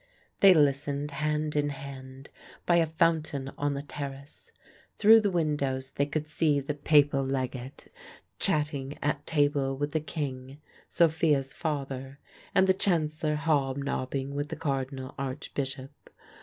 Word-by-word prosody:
They 195 -2 +8
listened, 145 0 +1
hand 150 +1 -1
in 145 0 +1
hand, 135 -1 -9 0.3
by 175 - +4
a 165 -1 +3
fountain 160 -4 0
on 145 0 -1
the 140 - -4
terrace. 140 -1 -8 0.5
Through 220 +1 +7
the 205 - +1
windows 140 -6 -1
they 140 +1 0
could 155 +1 -3
see 150 -2 +2
the 140 +2 -3
Papal 145 -1 +3
legate 130 -1 -4 0.5
chatting 150 -6 -1
at 145 0 -1
table 145 -3 +1
with 145 +1 -2
the 155 - +1
King, 140 -2 -5 0.3
Sophia's 155 -4 +2
father, 140 -4 -4 0.4
and 190 - +6
the 190 - +4
Chancellor 155 -5 0
hobnobbing 140 -3 -1
with 145 +1 -3
the - - -4
Cardinal 135 -2 -3
Archbishop. 135 0 -4
145 Hz, 130 wpm, -28 LUFS, 135-155 Hz, 0.5 s, They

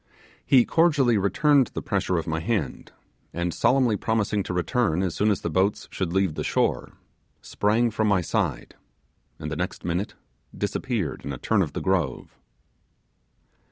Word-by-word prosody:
He 130 -3 +5
cordially 145 -8 +3
returned 130 - +3
the - - -2
pressure 90 - 0
of 80 - -2
my 80 0 -2
hand, 80 - -3 0.4
and 85 0 -1
solemnly 125 -4 +3
promising 105 -1 0
to 95 - -5
return 90 0 0
as 90 -3 -1
soon 105 - +1
as 100 - 0
the - - -2
boats 95 +5 0
should 90 -3 -3
leave 95 -3 +1
the - - -4
shore, - - 0 0.5
sprang 115 +3 +1
from 110 0 0
my 100 -3 +3
side, 85 - -2 0.6
and 75 - -6
the - - -2
next 90 +4 -4
minute 90 +4 -2 0.4
disappeared - - -2
in 70 - -4
a 65 - -5
turn - - +1
of - - -2
the - - -4
grove. 85 -9 -1
95 Hz, 160 wpm, -25 LUFS, 85-115 Hz, 0.6 s, He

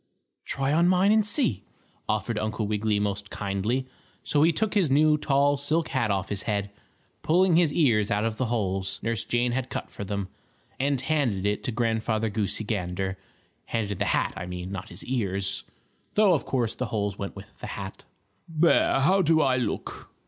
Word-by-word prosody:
"Try 135 +1 0
on 170 +2 +4
mine 185 +2 +4
and 215 0 +5
see," 205 - +1 0.5
offered 110 +1 0
Uncle 110 0 -2
Wiggily 105 0 0
most 100 0 -2
kindly. 105 +6 -2 0.4
So 145 - +3
he 165 +2 +5
took 210 +6 -1
his 195 -8 +2
new, 150 +3 +5
tall 145 -1 +2
silk 155 +4 0
hat 130 -5 0
off 95 -1 -1
his 100 -2 -2
head, 100 -1 -1 0.5
pulling 180 +2 +3
his 165 -3 +4
ears 115 -10 +3
out 105 +2 +1
of 110 -1 -2
the 130 - 0
holes 95 -5 -1
Nurse 115 -1 0
Jane 120 0 0
had 130 +1 -2
cut - - -5
for - - -6
them, 100 -1 -3 0.5
and 140 0 +1
handed 135 -10 0
it 105 0 0
to - - -1
Grandfather 110 -1 0
Goosey 105 +1 -1
Gander 95 -2 -3 0.5
handed 105 -4 -2
the - - +1
hat, - - +1
I 95 -2 -6
mean, 90 +1 -6
not 95 -1 -6
his 85 - -8
ears, 100 -6 -2 0.5
though 210 -3 +5
of 155 - 0
course 120 -4 0
the 130 - -3
holes 105 -2 -2
went 100 - -5
with - - -9
the - - -6
hat. - - -7 0.5
"There, 160 -4 +3
how 190 +8 +4
do 160 -2 +4
I 130 -3 +3
look?" 125 - -4
115 Hz, 185 wpm, -26 LUFS, 100-145 Hz, 0.5 s, and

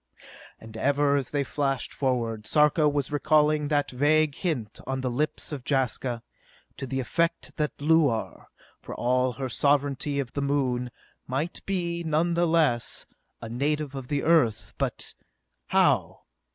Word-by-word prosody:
And 110 0 -12
ever, 140 +3 +2
as 135 -3 -1
they 145 -1 0
flashed 135 -1 -2
forward, 115 -5 -1
Sarka 150 0 +4
was 145 -2 -1
recalling 150 0 +3
that 145 -1 0
vague 150 +3 +3
hint 135 - -3
on 135 0 -2
the 130 -1 -1
lips 150 +6 -2
of 145 -3 -4
Jaska, 125 -3 -1 0.5
to 135 - -5
the 130 +1 -2
effect 170 +6 -1
that 150 -2 -1
Luar, 145 -6 +1 0.3
for - - -8
all 125 +1 +1
her 130 +2 -4
sovereignty 140 +2 +1
of 130 -4 -4
the 140 - -2
Moon, 130 -3 0 0.4
might 145 +7 -3
be, 170 -3 -1
nonetheless, 160 -5 +1 0.4
a - - -5
native 145 +4 -1
of 135 -2 -6
the 145 0 -1
Earth. 140 -10 +2
But.... - - -2 0.5
How? - - +2
140 Hz, 140 wpm, -26 LUFS, 125-150 Hz, 0.5 s, Sarka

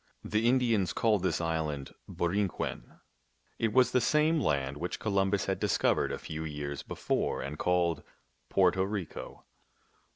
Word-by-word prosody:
The 110 +2 +1
Indians 115 -8 +2
called 110 -4 +2
this 90 -4 0
island 80 -4 -2 0.2
Borinquen; 95 +2 -2 0.6
it 115 - +1
was 130 +3 +4
the 125 - +3
same 155 +5 +3
land 70 - 0
which 85 +4 -3
Columbus 100 -2 +1
had - - -2
discov - - +2
ered - - 0
a - - -2
few 80 +1 -6
years 75 -2 -4
before - - -2
and 75 +2 -6
called 85 -3 +1 0.5
Porto 95 -1 +3
Rico. 95 -3 -5
90 Hz, 140 wpm, -30 LUFS, 80-105 Hz, 0.6 s, was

